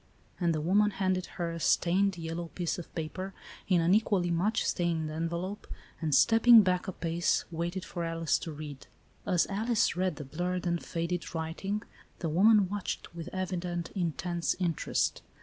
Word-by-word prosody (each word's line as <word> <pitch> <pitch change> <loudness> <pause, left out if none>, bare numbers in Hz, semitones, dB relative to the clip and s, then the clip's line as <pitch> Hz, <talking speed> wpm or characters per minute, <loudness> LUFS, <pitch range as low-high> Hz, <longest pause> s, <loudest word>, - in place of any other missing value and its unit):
And 175 -2 +2
the 155 - -1
woman 200 +6 +3
handed 185 -2 -1
her 170 -1 -1
a 165 - -5
stained, 185 +4 +2
yellow 165 +1 -4
piece 175 -1 -2
of 170 - -7
pa 165 - -1
per, 190 +1 -5 0.4
ip 180 -2 +4
an 170 +2 +3
equally 200 -4 +2
much 195 +7 +1
stained 165 -3 0
envelope, 170 +5 -3 0.3
and, 155 -3 +2
stepping 230 +3 +7
back 180 -1 0
a - - -1
pace, 170 -1 0
waited 170 +3 -3
for 175 - -4
Alice 165 -1 0
to 165 - -6
read. 150 -2 -8 0.4
As 175 -2 +3
Alice 220 +2 +1
read 185 -2 0
the 145 -1 -7
blurred 180 +6 -3
and 170 -1 0
faded 170 +1 -3
writing, 185 +6 -3 0.3
the 165 - -2
woman 200 +4 +5
watched, 200 -3 -4
with 170 0 -7
evident, 180 -2 -3
intense 175 -1 -1
interest. 170 -4 0
175 Hz, 165 wpm, -30 LUFS, 165-190 Hz, 0.4 s, stepping